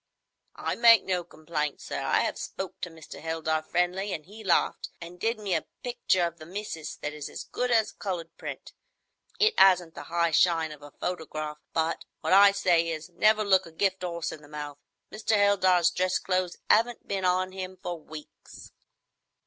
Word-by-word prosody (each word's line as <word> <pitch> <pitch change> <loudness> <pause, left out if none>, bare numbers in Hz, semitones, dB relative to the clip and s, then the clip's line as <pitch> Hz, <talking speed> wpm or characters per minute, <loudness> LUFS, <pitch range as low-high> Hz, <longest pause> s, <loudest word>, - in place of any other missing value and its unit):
"I - - -2
make 230 -3 +7
no 180 -2 -1
complaints, 155 -3 -4
sir. - - -3
I - - +2
have - - -1
spoke 190 - -6
to 180 - -3
Mr. 160 -2 -11
Heldar 160 -1 -1
friendly, 180 +5 -1
an' 155 - -4
he 210 +7 -12
laughed, 185 -4 +1
an' 170 +1 -9
did 225 +5 0
me 205 -3 -2
a - - -1 0.2
picture 190 -7 +1
of 170 0 -5
the 155 - -10
missis 185 -4 -5
that 150 - -5
is 150 -1 -6
as - - -7
good 250 0 -2
as 225 -3 +3
a - - -26
coloured 170 -4 -4
print. - - -8 0.7
It 435 +1 +5
'asn't 180 -4 +5
the - - -8
'igh 170 -1 +1
shine 165 -1 +3
of 150 -1 -11
a 145 - -11
photograph, 155 -3 -5
but 160 +1 -1 0.2
what - - +1
I 200 +1 +8
say 175 -4 +2
is, 160 +1 -5
'Never 215 +5 +3
look 190 -4 +3
a - - -12
gift 190 +3 0
horse 170 -2 -3
in 155 - -9
the 145 - -15
mouth.' 145 -1 -7 0.3
Mr. 220 0 0
Heldar's 185 -4 +4
dress 185 +1 +1
clothes 185 -2 -1
'aven't 230 +2 +2
been 195 -1 -2
on 185 +1 +2
him 185 0 -6
for 175 -2 -5
weeks." 155 0 -12
180 Hz, 190 wpm, -28 LUFS, 160-195 Hz, 0.7 s, I